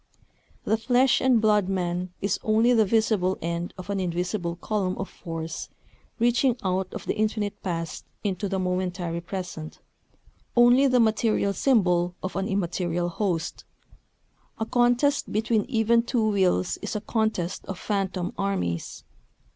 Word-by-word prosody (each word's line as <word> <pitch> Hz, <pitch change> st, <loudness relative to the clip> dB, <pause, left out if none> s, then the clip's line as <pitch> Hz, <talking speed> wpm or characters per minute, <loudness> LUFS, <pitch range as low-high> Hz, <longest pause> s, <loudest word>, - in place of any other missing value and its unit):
The 220 Hz, -, +1 dB
flesh 255 Hz, +3 st, +3 dB
and 255 Hz, -3 st, +4 dB
blood 210 Hz, -3 st, +3 dB
man 180 Hz, -1 st, -2 dB
is 200 Hz, -, 0 dB
only 225 Hz, +3 st, +3 dB
the 220 Hz, -2 st, +4 dB
visible 210 Hz, -3 st, +2 dB
end 170 Hz, +1 st, -3 dB
of 185 Hz, +2 st, -6 dB
an 200 Hz, -, -1 dB
invisible 175 Hz, 0 st, -2 dB
column 190 Hz, 0 st, -2 dB
of 195 Hz, -, -3 dB
force 165 Hz, -1 st, -6 dB, 0.5 s
reaching 240 Hz, +1 st, +2 dB
out 185 Hz, 0 st, -1 dB
of -, -, -7 dB
the -, -, -1 dB
infinite 210 Hz, -1 st, -1 dB
past 165 Hz, -3 st, -4 dB, 0.2 s
into 200 Hz, -1 st, -2 dB
the 195 Hz, -, -1 dB
momentary 180 Hz, -2 st, -2 dB
present, 175 Hz, -3 st, -6 dB, 0.8 s
only 245 Hz, +3 st, +6 dB
the 255 Hz, -2 st, +3 dB
material 220 Hz, -2 st, +2 dB
Symbol 180 Hz, -9 st, +2 dB
of 185 Hz, -, -4 dB
an 195 Hz, 0 st, -1 dB
immaterial 175 Hz, -3 st, -1 dB
host. 175 Hz, -3 st, -2 dB, 0.9 s
A 220 Hz, -, -2 dB
contest 245 Hz, +4 st, +2 dB
between 220 Hz, 0 st, +1 dB
even 230 Hz, -2 st, +3 dB
two 235 Hz, -2 st, 0 dB
wills 185 Hz, -, +1 dB
is -, -, -4 dB
a 210 Hz, -, -2 dB
contest 220 Hz, -6 st, -1 dB
of 195 Hz, -, -5 dB
phantom 190 Hz, -3 st, -2 dB
armies. 190 Hz, -, -2 dB
195 Hz, 140 wpm, -26 LUFS, 180-225 Hz, 0.9 s, only